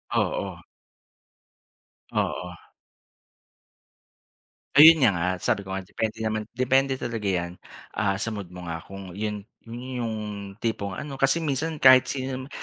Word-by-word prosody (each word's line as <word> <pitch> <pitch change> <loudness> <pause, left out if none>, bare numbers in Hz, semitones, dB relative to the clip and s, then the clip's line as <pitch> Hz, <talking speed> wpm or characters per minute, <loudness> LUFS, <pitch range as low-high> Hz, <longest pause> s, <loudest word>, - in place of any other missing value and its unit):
Oo. - - -1 1.5
Oo. 90 -1 -2 2.2
Ayun 160 +1 +10
niya 125 - +6
nga 85 - 0 0.2
sabi 100 -2 0
ko 95 - -5
nga 95 - -2
depende 110 +3 -4
naman 110 -1 -1
depende 130 +2 +2
talaga 115 -4 -4
yan, 90 -2 -1 0.4
ah, 100 -2 +2
sa 115 - -1
mood 100 -5 -7
mo 90 -1 -8
nga 80 - -3
kung 95 -1 -9
'yon 105 -1 -3 0.2
'yon 125 +3 -7
yung 115 -2 -2 0.5
tipong 100 -4 -2
ano 140 +4 -6
kasi 135 +5 +2
minsan 155 +1 -2
kahit 130 -1 +8
sino 130 -1 -3
naman, - - -15
110 Hz, 140 wpm, -25 LUFS, 100-130 Hz, 2.2 s, Ayun